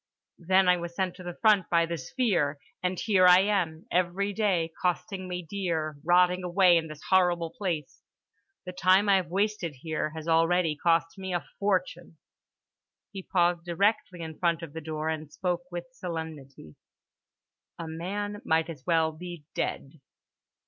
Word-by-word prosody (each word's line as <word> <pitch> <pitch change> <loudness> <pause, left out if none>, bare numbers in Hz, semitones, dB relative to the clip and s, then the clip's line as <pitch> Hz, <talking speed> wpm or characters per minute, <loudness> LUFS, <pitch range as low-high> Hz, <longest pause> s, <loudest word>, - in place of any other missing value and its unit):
Then 185 +2 +3
I 180 0 +5
was 170 0 -6
sent 185 -1 -1
to 185 - -10
the 175 -1 -7
front 210 -5 +4
by 170 -1 +3
The 170 0 -3
Sphere—and 170 - -2
here 190 -5 +4
I 180 +1 +8
am, 180 -6 -1
every 185 +3 0
day 185 -6 0
costing 185 +1 -2
me 180 -1 -5
dear, 165 -5 -2
rotting 180 +1 +3
away 180 0 +4
in 160 -1 -1
this 155 -1 -10
horrible 175 -3 +3
place. 165 -6 -4 0.6
The 180 - -5
time 185 +2 +3
I 200 -1 +5
have 185 -2 -2
wasted 195 -4 -1
here 155 -1 -2
has 160 0 -7
already 165 0 +3
cost 165 +3 +1
me 190 -1 -3
a 175 - -3
fortune." 180 -4 -1 0.9
He 195 - -6
paused 175 -2 +1
directly 180 +1 0
in 160 -1 -7
front 170 -2 +1
of 155 -3 -8
the 160 - -6
door 155 0 -4
and 155 -2 -3
spoke 175 0 -2
with 175 -1 -5
solemnity: 160 - -7 1.0
"A 165 - -6
man 205 +6 -4
might 160 +1 +1
as 140 -5 -11
well 165 -2 +3
be 170 -1 -9
dead." 140 +2 -4
175 Hz, 160 wpm, -28 LUFS, 160-185 Hz, 1.0 s, I